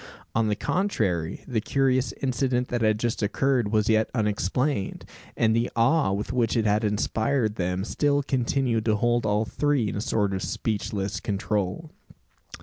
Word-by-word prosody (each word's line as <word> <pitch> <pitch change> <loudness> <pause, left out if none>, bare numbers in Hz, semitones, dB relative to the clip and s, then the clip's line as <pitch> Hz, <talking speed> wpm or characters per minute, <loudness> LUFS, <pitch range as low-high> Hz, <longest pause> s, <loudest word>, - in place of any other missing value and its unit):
On 110 0 +2
the 105 - +1
contrary, 100 - -1
the 115 -4 -1
curious 130 +1 +1
incident 125 -1 0
that 120 -1 -1
had 110 -1 +3
just 115 +1 -2
occurred 120 +1 +1
was 110 -1 +2
yet 110 0 +3
unexplained; 105 - -1 0.3
and 110 -1 +3
the 115 +1 +1
awe 120 +1 +3
with 100 +5 -3
which 120 -2 +1
it 110 - +1
had 105 +1 +2
inspired 110 +3 0
them 90 -1 -2
still 145 +3 +1
continued 125 -3 0
to 110 -2 +3
hold 120 +1 +1
all 105 +1 +1
three 140 -2 0
in - - -4
a 105 - -2
sort 105 -3 0
of 95 - -2
speechless 105 -1 -2
control. 105 - -2
110 Hz, 160 wpm, -26 LUFS, 105-125 Hz, 0.3 s, had